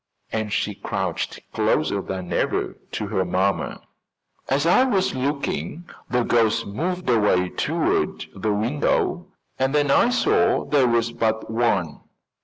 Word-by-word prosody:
And 110 Hz, -1 st, -2 dB
she -, -, 0 dB
crouched -, -, -3 dB
closer 90 Hz, +6 st, +1 dB
than 95 Hz, -1 st, -5 dB
ever -, -, 0 dB, 0.2 s
to -, -, -2 dB
her 95 Hz, -, +1 dB
mamma. 95 Hz, +2 st, -1 dB, 0.7 s
"As 140 Hz, +3 st, +1 dB
I 180 Hz, +9 st, +5 dB
was 200 Hz, -8 st, +1 dB
looking, 140 Hz, +5 st, -3 dB, 0.2 s
the 125 Hz, -1 st, +1 dB
ghost 115 Hz, -1 st, +2 dB
moved 175 Hz, -, -3 dB
away 105 Hz, -6 st, +3 dB
toward -, -, -1 dB
the 105 Hz, +3 st, -1 dB
window 115 Hz, +8 st, 0 dB, 0.3 s
and 135 Hz, +2 st, +1 dB
then 145 Hz, -1 st, +3 dB
I 235 Hz, -, +5 dB
saw 230 Hz, -2 st, +2 dB
there 140 Hz, -4 st, +3 dB
was 115 Hz, -1 st, +1 dB
but 110 Hz, -1 st, -1 dB
one. 110 Hz, -9 st, 0 dB
115 Hz, 135 wpm, -23 LUFS, 105-145 Hz, 0.7 s, I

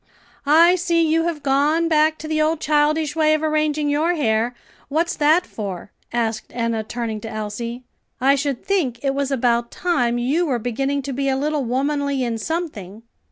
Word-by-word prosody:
"I 330 Hz, +4 st, +6 dB
see 340 Hz, -2 st, +1 dB
you 325 Hz, +1 st, +2 dB
have 325 Hz, -3 st, -3 dB
gone 290 Hz, +4 st, +2 dB
back 310 Hz, -1 st, +3 dB
to 310 Hz, -, -8 dB
the 310 Hz, 0 st, 0 dB
old 310 Hz, +1 st, +1 dB
childish 300 Hz, 0 st, +1 dB
way 310 Hz, -1 st, +3 dB
of 310 Hz, -, -3 dB
arranging 305 Hz, -1 st, 0 dB
your 310 Hz, +4 st, +1 dB
hair. 235 Hz, -4 st, 0 dB, 0.3 s
What's 330 Hz, +4 st, 0 dB
that 315 Hz, +4 st, +3 dB
for?" 200 Hz, -4 st, -6 dB, 0.2 s
asked 225 Hz, -2 st, -1 dB
Enna, 230 Hz, -2 st, -1 dB
turning 220 Hz, -1 st, -4 dB
to 225 Hz, -, -6 dB
Elsie; 220 Hz, +3 st, -5 dB, 0.4 s
"I 270 Hz, +2 st, +4 dB
should 280 Hz, -2 st, -2 dB
think 325 Hz, -12 st, 0 dB
it 275 Hz, -1 st, +1 dB
was 280 Hz, 0 st, -1 dB
about 235 Hz, -3 st, +1 dB
time 250 Hz, -10 st, 0 dB
you 285 Hz, +9 st, +1 dB
were 260 Hz, -4 st, +1 dB
beginning 270 Hz, +5 st, -2 dB
to 275 Hz, 0 st, -4 dB
be 275 Hz, +1 st, -1 dB
a 265 Hz, -, +1 dB
little 295 Hz, +1 st, -1 dB
womanly 280 Hz, +2 st, 0 dB
in 230 Hz, -2 st, -2 dB
something." 225 Hz, -, -5 dB
280 Hz, 180 wpm, -21 LUFS, 240-310 Hz, 0.4 s, I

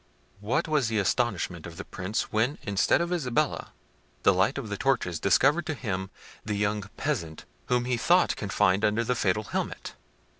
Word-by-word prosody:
What 125 Hz, +12 st, 0 dB
was 150 Hz, -6 st, +2 dB
the 110 Hz, -1 st, -1 dB
astonishment 100 Hz, -6 st, 0 dB
of 85 Hz, 0 st, -11 dB
the -, -, -6 dB
Prince 95 Hz, +4 st, -3 dB
when, 115 Hz, +7 st, +1 dB
instead 100 Hz, -, +2 dB
of 170 Hz, +1 st, -1 dB
Isabella, 150 Hz, -2 st, -1 dB, 0.5 s
the 100 Hz, -, +6 dB
light 95 Hz, +9 st, +2 dB
of 135 Hz, -5 st, -4 dB
the 105 Hz, -, -2 dB
torches 100 Hz, -9 st, 0 dB
discovered 145 Hz, +11 st, +3 dB
to 160 Hz, -, -2 dB
him 95 Hz, -7 st, -3 dB, 0.3 s
the 105 Hz, -1 st, -2 dB
young 105 Hz, 0 st, -1 dB
peasant 100 Hz, -, -3 dB, 0.2 s
whom 125 Hz, -1 st, +1 dB
he 125 Hz, -1 st, 0 dB
thought 175 Hz, +8 st, +3 dB
confined 100 Hz, -1 st, +1 dB
under 110 Hz, +2 st, +2 dB
the 125 Hz, -, 0 dB
fatal 105 Hz, -3 st, 0 dB
helmet! -, -, -4 dB
110 Hz, 175 wpm, -27 LUFS, 100-135 Hz, 0.5 s, the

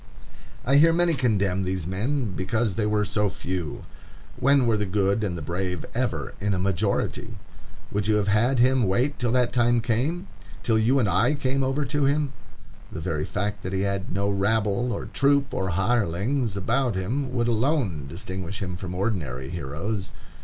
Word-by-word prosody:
I 135 Hz, +2 st, +5 dB
hear 165 Hz, +3 st, +7 dB
many 175 Hz, 0 st, +3 dB
condemn 100 Hz, -8 st, +1 dB
these 95 Hz, -3 st, -2 dB
men 110 Hz, -, -1 dB
because 100 Hz, +4 st, 0 dB
they 105 Hz, +2 st, 0 dB
were 105 Hz, 0 st, +1 dB
so 105 Hz, 0 st, +1 dB
few. 90 Hz, -5 st, -4 dB, 0.5 s
When 140 Hz, -1 st, +3 dB
were 115 Hz, -2 st, +3 dB
the 105 Hz, -1 st, -1 dB
good 100 Hz, +2 st, +1 dB
and 90 Hz, -4 st, -2 dB
the 80 Hz, -, -6 dB
brave 90 Hz, +1 st, -3 dB
ever -, -, -2 dB
in 100 Hz, -1 st, +1 dB
a -, -, -1 dB
majority? 95 Hz, -1 st, -1 dB, 0.6 s
Would 105 Hz, 0 st, -1 dB
you 110 Hz, -, +3 dB
have 105 Hz, -1 st, +1 dB
had 120 Hz, +6 st, +3 dB
him 125 Hz, -2 st, +4 dB
wait 125 Hz, +10 st, +1 dB
till 120 Hz, -2 st, 0 dB
that 125 Hz, -1 st, +2 dB
time 120 Hz, -1 st, +3 dB
came?—till 115 Hz, -, -2 dB
you 120 Hz, +5 st, +3 dB
and 120 Hz, -6 st, +3 dB
I 110 Hz, +10 st, +3 dB
came 135 Hz, -1 st, 0 dB
over 135 Hz, +2 st, 0 dB
to 145 Hz, +1 st, 0 dB
him? 140 Hz, 0 st, +1 dB, 0.6 s
The -, -, -5 dB
very -, -, -2 dB
fact 105 Hz, 0 st, -3 dB
that 95 Hz, -, -5 dB
he 95 Hz, -, 0 dB
had 100 Hz, -1 st, -2 dB
no 100 Hz, +1 st, 0 dB
rabble 105 Hz, +4 st, +1 dB
or -, -, -3 dB
troop 140 Hz, 0 st, +2 dB
of 95 Hz, -7 st, -1 dB
hirelings 105 Hz, +4 st, 0 dB
about 120 Hz, +4 st, 0 dB
him 125 Hz, +9 st, -2 dB
would 120 Hz, -2 st, 0 dB
alone 115 Hz, -, 0 dB
distinguish 95 Hz, +3 st, -6 dB
him 90 Hz, -2 st, -4 dB
from 90 Hz, -1 st, -6 dB
ordinary 75 Hz, -, -2 dB
heroes. 85 Hz, +6 st, -4 dB
105 Hz, 175 wpm, -25 LUFS, 95-125 Hz, 0.6 s, hear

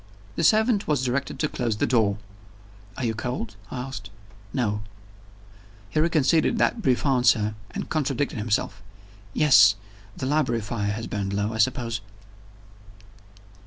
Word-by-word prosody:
The -, -, -1 dB
servant 220 Hz, -1 st, +3 dB
was 145 Hz, -4 st, +1 dB
directed 130 Hz, +2 st, -1 dB
to 150 Hz, -, 0 dB
close 115 Hz, -6 st, -2 dB
the -, -, +1 dB
door. 110 Hz, -4 st, +2 dB, 0.8 s
"Are 130 Hz, -, -2 dB
you 115 Hz, -, 0 dB
cold?" 115 Hz, -1 st, -4 dB
I -, -, -6 dB
asked. 125 Hz, -7 st, -7 dB, 0.4 s
"No." 105 Hz, -5 st, -1 dB, 1.1 s
He -, -, 0 dB
reconsidered 160 Hz, -, +3 dB
that 225 Hz, +1 st, +1 dB
brief 130 Hz, -, +1 dB
answer, 120 Hz, -5 st, +3 dB, 0.2 s
and -, -, -5 dB
contradicted 140 Hz, -5 st, -1 dB
himself. 105 Hz, -1 st, -1 dB, 0.5 s
"Yes 115 Hz, -9 st, +6 dB, 0.4 s
the -, -, -3 dB
library 130 Hz, -5 st, +1 dB
fire 105 Hz, -1 st, -2 dB
has 115 Hz, +2 st, -5 dB
burned 100 Hz, -1 st, -3 dB
low, 105 Hz, +2 st, -1 dB
I 110 Hz, -, -5 dB
suppose." 120 Hz, -1 st, 0 dB
120 Hz, 135 wpm, -25 LUFS, 105-140 Hz, 1.1 s, Yes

